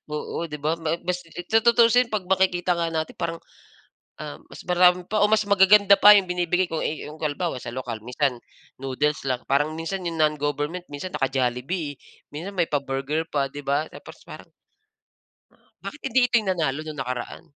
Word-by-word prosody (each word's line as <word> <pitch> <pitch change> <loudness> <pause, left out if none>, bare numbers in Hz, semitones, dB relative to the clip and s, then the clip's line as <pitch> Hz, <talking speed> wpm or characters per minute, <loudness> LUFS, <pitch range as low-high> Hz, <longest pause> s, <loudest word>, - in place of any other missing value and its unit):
Oo, 150 +2 -4
di 150 - -5
ba, 155 +3 0
ma 160 0 -1
bas 180 0 -2
eh, 175 +2 -8
tutuusin 235 +2 +4
pag 195 -4 -2
makikita 185 -1 +2
nga 170 -1 -1
natin 160 0 -3
parang, 165 -1 -3 0.8
um, - - -7
mas - - -11
marami 180 0 +4
pa 215 0 0
o 210 - +5
mas 215 0 +3
magaganda 200 0 +6
pa 210 0 +9
yung 190 -3 +2
binibigay 180 +1 +1
ko, 160 - -2
eh, 155 - -3
yung 155 +1 -11
kalbawa 155 0 -2
sa 120 - -7
lokal 125 -4 -5
minsan, 125 0 -1 0.4
noodles 140 +3 -1
lang. 125 -1 -2
Parang 145 +3 +2
minsan 180 +3 -4
yung 165 - -3
non-government 150 +3 -1
minsan 145 +6 -6
naka-Jollibee, 135 +3 -2 0.3
minsan 180 +7 -7
may 170 -2 +1
pa-burger 140 +2 -2
pa, 140 -2 -1
di 145 - -7
ba 140 +3 0
tapos - - -12
parang - - -12 1.3
Bakit 295 - -7
hindi 260 +3 +4
ito 250 - -11
yung 195 - -5
nanalo 155 -6 -1
nung 155 -2 -8
nakaraan? 125 -2 -5
160 Hz, 175 wpm, -24 LUFS, 145-185 Hz, 1.3 s, pa